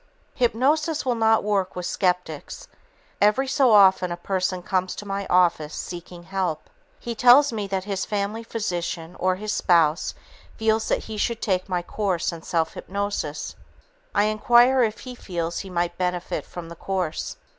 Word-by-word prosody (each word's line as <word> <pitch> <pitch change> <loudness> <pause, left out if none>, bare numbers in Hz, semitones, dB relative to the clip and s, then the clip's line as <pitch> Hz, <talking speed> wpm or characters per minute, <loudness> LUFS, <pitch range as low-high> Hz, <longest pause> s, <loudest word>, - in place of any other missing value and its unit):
Hypnosis 285 +6 +1
will 250 - +2
not 225 -1 +3
work 200 -3 0
with 180 -1 -4
skeptics. 180 -6 -2 0.5
Every 210 +6 +3
so 265 -2 +3
often 190 -3 +6
such 175 - -4
a 175 - -32
person 185 -1 -1
comes 185 0 -1
to 205 - -8
my 195 0 -3
office 170 -4 +2
seeking 175 0 -7
help. 185 -4 -3 0.3
He 235 - -5
tells 250 +4 +6
me 210 -3 -3
that 190 -1 -2
his 195 -1 -3
family 210 +2 -2
physician 175 -6 -4
or 185 0 +2
his 210 +2 -3
spouse 165 -2 +2 0.4
feels 220 0 +1
he 220 - -2
should 230 +2 -1
take 185 -1 -1
my 180 -1 -1
course 185 -2 -1
in 165 -1 -8
self 160 -1 -1
hypnosis. 200 -6 -4 0.6
I - - +4
inquire 240 +4 +4
if 220 -2 0
he 255 - -8
feels 170 -7 -4
he 195 - -7
might 175 -1 -2
benefit 180 -1 -2
from 170 -2 -8
the 170 - -9
course. 180 -3 -3
195 Hz, 165 wpm, -24 LUFS, 175-220 Hz, 0.6 s, often